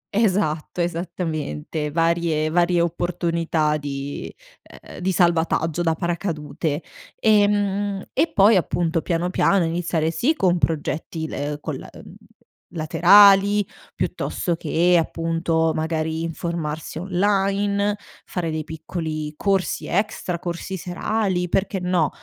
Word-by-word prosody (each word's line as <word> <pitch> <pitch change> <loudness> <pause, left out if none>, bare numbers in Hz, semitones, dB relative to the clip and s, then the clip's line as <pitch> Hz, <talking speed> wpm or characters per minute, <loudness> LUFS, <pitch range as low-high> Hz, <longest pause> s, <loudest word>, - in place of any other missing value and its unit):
Esatto, 185 -7 0
esattamente, 160 - -3
varie 165 -1 +1
varie 175 +1 +3
opportunità 170 -2 0
di, 140 -1 -5 0.6
uhm, - - -9
di 185 +1 0
salvataggio 170 -2 +1
da 165 -2 +1
paracadute. 165 -3 -3 0.3
Ehm, 205 -2 +2
e 335 - +1
poi, 205 +2 +5
appunto, 170 -2 +1
piano, 175 +1 -1
piano 190 -1 +3
iniziare 165 -1 -1
sì 265 - +1
con 180 - +2
progetti, 160 0 -2
ehm, 145 -1 -3
col - - -5
uhm, - - -13 0.6
laterali, 200 +5 +6 0.3
piuttosto 175 -4 -2
che 170 +2 +2
appunto, 165 0 0
magari 160 0 -1
informarsi 165 -2 -4
online, 200 +2 +1 0.3
fare 175 -3 -3
dei 155 0 -2
piccoli 160 -1 -5
corsi 195 -2 0
extra, 190 -3 -1
corsi 175 +2 -4
serali. 180 +1 -1
Perché 195 +2 0
no? 180 -4 +1
170 Hz, 110 wpm, -22 LUFS, 160-190 Hz, 0.6 s, laterali